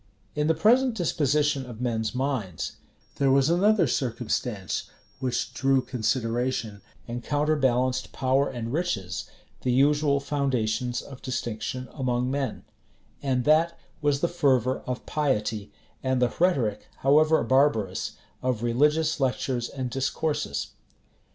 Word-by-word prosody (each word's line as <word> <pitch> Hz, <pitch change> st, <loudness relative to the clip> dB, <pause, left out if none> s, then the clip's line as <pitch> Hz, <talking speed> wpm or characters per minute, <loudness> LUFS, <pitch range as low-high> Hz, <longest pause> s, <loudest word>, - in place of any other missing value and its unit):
In 150 Hz, 0 st, 0 dB
the 160 Hz, -, +3 dB
present 245 Hz, +5 st, +4 dB
disposition 150 Hz, -, +1 dB
of 115 Hz, -3 st, -9 dB
men's 115 Hz, -2 st, -1 dB
minds, 125 Hz, -, -2 dB, 0.4 s
there 140 Hz, -1 st, +3 dB
was 135 Hz, +3 st, +4 dB
another 195 Hz, +1 st, +4 dB
circumstance 120 Hz, -, -2 dB, 0.3 s
which 125 Hz, -2 st, -2 dB
drew 135 Hz, 0 st, +3 dB
consideration, 115 Hz, -2 st, -1 dB, 0.3 s
and 120 Hz, 0 st, -5 dB
counterbalanced 130 Hz, -4 st, +1 dB
power 135 Hz, +1 st, +1 dB
and 120 Hz, -2 st, -5 dB
riches, 115 Hz, -, -2 dB, 0.3 s
the 125 Hz, -, 0 dB
usual 140 Hz, +2 st, +3 dB
foundations 125 Hz, -4 st, -1 dB
of 135 Hz, -2 st, -11 dB
distinction 125 Hz, 0 st, -3 dB
among 125 Hz, -2 st, -1 dB
men; 135 Hz, -4 st, -2 dB, 0.6 s
and 130 Hz, -3 st, 0 dB
that 160 Hz, +3 st, +4 dB, 0.2 s
was 145 Hz, -1 st, +1 dB
the 170 Hz, -, +3 dB
fervor 130 Hz, -7 st, +2 dB
of 125 Hz, -1 st, -4 dB
piety, 110 Hz, -8 st, -1 dB, 0.3 s
and 130 Hz, -1 st, +1 dB
the 125 Hz, -1 st, +2 dB
rhetoric, 140 Hz, -, +1 dB
however 155 Hz, +3 st, +4 dB
barbarous, 115 Hz, -7 st, +2 dB, 0.3 s
of 125 Hz, -3 st, -1 dB
religious 150 Hz, +7 st, +2 dB
lectures 125 Hz, -2 st, -1 dB
and 130 Hz, -3 st, -4 dB
discourses. 135 Hz, -, -1 dB
130 Hz, 120 wpm, -26 LUFS, 120-145 Hz, 0.6 s, present